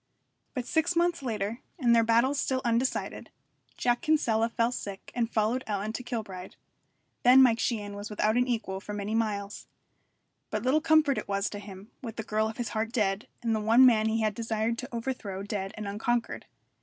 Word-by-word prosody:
But 250 -2 -2
six 335 +4 +1
months 345 -1 +2
later, 220 -2 -3 0.2
and 240 -7 +4
their 230 - +5
battles 235 +5 +3
still 260 -1 -1
undecided, 240 +2 -1 0.5
Jack 240 0 +1
Kinsella 230 -8 +2
fell 230 +1 +1
sick 200 -5 -7
and 235 -2 0
followed 225 +4 +1
Ellen 210 +1 -2
to 250 - -4
Kilbride. 215 -7 -6 0.7
Then 255 +2 +8
Mike 230 -3 +4
Sheehan 205 -4 -2
was 205 +1 -6
without 215 +1 +1
an 245 +1 +2
equal 220 -6 -2
for 210 +1 -7
many 205 +1 -3
miles. 210 -3 -2 0.8
But - - -2
little 270 +5 +3
comfort 310 -4 +4
it - - -8
was 200 +1 -1
to 205 - -5
him, 200 +1 -11
with 230 -4 -6
the 220 - -4
girl 215 +1 0
of 220 - -8
his 240 - -3
heart 220 +1 -2
dead, 205 -3 0 0.2
and 225 -1 +1
the - - 0
one 230 +4 +6
man 220 -3 +5
he 220 +1 +1
had 215 -1 +1
desired 225 +1 -1
to 255 - -6
overthrow 230 -5 -4
dead 200 -1 -3
and 210 -1 -5
unconquered. 230 +4 -2
225 Hz, 195 wpm, -28 LUFS, 210-245 Hz, 0.8 s, Then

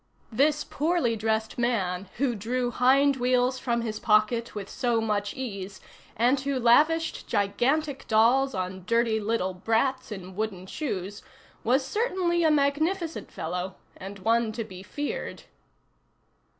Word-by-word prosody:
This 290 +6 +2
poorly 300 -6 0
dressed 220 +1 -1
man, 195 -6 -1
who 255 -1 +1
drew 240 +3 -2
"hind 270 +3 +4
wheels" 250 +1 +2
from 235 -2 0
his 215 -2 -4
pocket 220 +2 +2
with 200 -2 -5
so 240 -1 0
much 205 -2 -1
ease, 200 -6 -6 0.4
and 245 +5 +3
who 275 0 -1
lavished 305 +8 +3
gigantic 265 +8 0
dolls 245 +5 +3
on 185 0 -4
dirty 230 -1 +2
little 210 -3 -1
brats 230 +6 0
in 190 -2 -7
wooden 200 -3 -3
shoes, 200 - -4 0.4
was 260 +4 +2
certainly 360 - 0
a 320 - +5
magnificent 310 +4 0
fellow, 180 +3 -4 0.2
and 195 +2 -8
one 225 +3 +1
to 230 +1 -3
be 185 -3 -10
feared. 290 +9 -5
235 Hz, 135 wpm, -27 LUFS, 205-270 Hz, 0.4 s, a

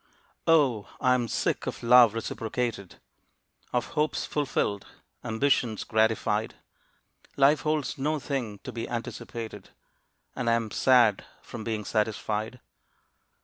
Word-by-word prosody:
Oh, 140 -10 +3
I 130 -1 +3
am 125 -2 0
sick - - -1
of - - -5
love 120 -2 +7
reciprocated, 115 -3 -3 0.8
Of 125 - -1
hopes 150 0 -1
fulfilled, 120 -8 -1 0.4
ambitions 120 -1 +1
gratified. 110 -1 +1 0.8
Life 140 +2 +5
holds 155 -3 -1
no 150 +3 0
thing 130 -7 -3
to - - -6
be 115 -1 -5
anticipated, 115 -3 -6 0.7
And 120 -2 -1
I - - +4
am 115 -2 -1
sad 120 -5 +4 0.2
from 115 -2 -8
being 110 -2 -3
satisfied. 110 +2 -2
115 Hz, 115 wpm, -27 LUFS, 110-130 Hz, 0.8 s, love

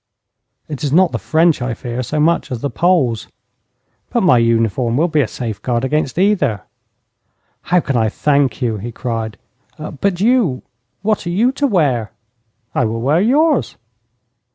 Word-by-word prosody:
'It 150 -1 -6
is 145 - -1
not 180 +3 +4
the - - -3
French 160 -2 +2
I 125 -1 -2
fear 120 +2 -5
so 150 +5 -3
much 165 0 +1
as 120 -3 -4
the 140 - -2
Poles.' 155 -11 +1 0.8
'But 240 - 0
my 160 -10 +5
uniform 115 +1 +1
will 165 +4 +3
be 155 -3 +1
a 125 - 0
safeguard 120 +2 -3
against 150 0 -1
either.' 185 - +1 1.0
'How 180 +1 +2
can 140 - -2
I 110 -2 +2
thank 140 +1 +1
you?' 115 -3 0
he 115 +4 -6
cried. 115 -2 -4 0.4
'But 170 +4 -3
you 215 - +2 0.4
what 215 -3 0
are - - -1
you 220 +9 +2
to 280 +1 0
wear?' 140 - +1 0.6
'I 125 - +1
will 115 +1 -2
wear 145 +8 +2
yours.' 295 +8 +2
140 Hz, 160 wpm, -17 LUFS, 120-175 Hz, 1.0 s, my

